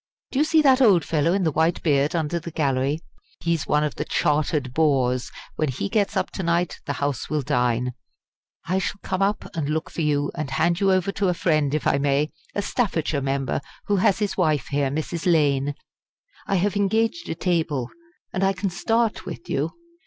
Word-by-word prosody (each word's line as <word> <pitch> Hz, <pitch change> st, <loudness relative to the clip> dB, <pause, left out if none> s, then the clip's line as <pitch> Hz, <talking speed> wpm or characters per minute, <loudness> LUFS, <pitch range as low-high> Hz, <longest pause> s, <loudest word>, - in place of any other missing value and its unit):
Do 265 Hz, -, 0 dB
you 300 Hz, -, +4 dB
see 315 Hz, -1 st, +4 dB
that 270 Hz, -2 st, +5 dB
old 200 Hz, -9 st, +5 dB
fellow 160 Hz, +1 st, +1 dB
in 190 Hz, +1 st, +1 dB
the 160 Hz, -, +2 dB
white 160 Hz, +3 st, +1 dB
beard 145 Hz, 0 st, +2 dB
under 165 Hz, +1 st, 0 dB
the 170 Hz, -, -7 dB
gallery? 140 Hz, -1 st, 0 dB, 0.4 s
He 170 Hz, -, 0 dB
is 165 Hz, -, -2 dB
one 150 Hz, 0 st, +2 dB
of 150 Hz, -, -1 dB
the -, -, -3 dB
chartered 150 Hz, -4 st, 0 dB
bores. 130 Hz, -5 st, +1 dB, 0.3 s
When 155 Hz, -, +1 dB
he 135 Hz, +10 st, -3 dB
gets 210 Hz, -2 st, +1 dB
up -, -, -1 dB
to -, -, -4 dB
night 170 Hz, 0 st, 0 dB
the -, -, 0 dB
House 140 Hz, -3 st, -2 dB
will 150 Hz, -2 st, 0 dB
dine. 125 Hz, -2 st, 0 dB, 0.7 s
I 185 Hz, +2 st, +1 dB
shall 195 Hz, +2 st, -3 dB
come 185 Hz, -, -2 dB
up 200 Hz, +2 st, +1 dB
and 150 Hz, -3 st, -2 dB
look 155 Hz, +1 st, -2 dB
for -, -, -4 dB
you, 145 Hz, -2 st, +1 dB
and 155 Hz, -4 st, -4 dB
hand 170 Hz, +6 st, +1 dB
you 195 Hz, -1 st, +3 dB
over 185 Hz, +1 st, +2 dB
to 195 Hz, 0 st, 0 dB
a 180 Hz, -, 0 dB
friend 155 Hz, -4 st, +1 dB
if 155 Hz, -, -2 dB
I 140 Hz, -, +3 dB
may 140 Hz, +2 st, +1 dB, 0.2 s
a 205 Hz, -, 0 dB
Staffordshire 165 Hz, -, 0 dB
member, 135 Hz, +1 st, -1 dB, 0.2 s
who 205 Hz, -, +1 dB
has 190 Hz, +1 st, +3 dB
his 205 Hz, -1 st, -1 dB
wife 155 Hz, -8 st, +1 dB
here 140 Hz, -1 st, +1 dB
Mrs. 155 Hz, +4 st, -1 dB
Lane. 145 Hz, -3 st, +2 dB, 0.7 s
I 195 Hz, -, +1 dB
have 200 Hz, +3 st, +1 dB
engaged 225 Hz, -, 0 dB
a -, -, -2 dB
table, 160 Hz, -8 st, -1 dB, 0.4 s
and 190 Hz, -, 0 dB
I 195 Hz, 0 st, +3 dB
can 195 Hz, 0 st, -2 dB
start 225 Hz, +4 st, 0 dB
with 115 Hz, -, -7 dB
you. 145 Hz, +4 st, 0 dB
160 Hz, 205 wpm, -24 LUFS, 145-190 Hz, 0.7 s, that